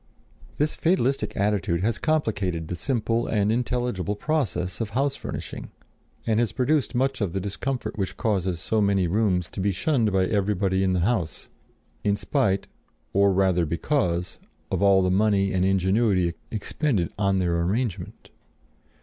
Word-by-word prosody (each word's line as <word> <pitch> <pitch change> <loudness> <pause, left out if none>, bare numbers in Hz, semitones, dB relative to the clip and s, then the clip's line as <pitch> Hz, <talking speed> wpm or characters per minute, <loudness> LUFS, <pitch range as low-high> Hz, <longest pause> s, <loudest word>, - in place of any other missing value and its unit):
This 150 +1 0
fatalistic 135 - 0
attitude 100 -4 +1
has 110 +4 0
complicated 100 - 0
the 90 - -2
simple 115 +4 -1
and 105 -1 +1
intelligible 120 -4 -1
process 105 - -1
of 110 - -2
house 140 0 +1
furnishing, - - -6 0.6
and 110 -1 +2
has 120 -2 0
produced 135 -1 +1
much 135 0 0
of 95 -5 -1
the 95 - -1
discomfort 110 +5 -4
which 95 - -3
causes 95 -6 0
so 110 +6 0
many 100 -2 +2
rooms 90 -2 +1
to - - -8
be 100 +1 +1
shunned 115 - +1
by 95 -1 +2
everybody 95 -2 +1
in 95 -1 +2
the 90 - +1
house, 95 -5 -1 0.5
in 100 -1 +2
spite 100 -1 0 0.5
(or 100 0 +4
rather 95 -2 +2
because) 85 - -1 0.3
of - - 0
all 100 -1 +5
the 90 - +2
money 100 0 +2
and 95 0 +2
ingenuity 95 -1 +2 0.2
expended 110 - -1
on 100 -2 +2
their 85 -2 +1
arrangement. 100 +1 -3
100 Hz, 150 wpm, -25 LUFS, 95-115 Hz, 0.6 s, all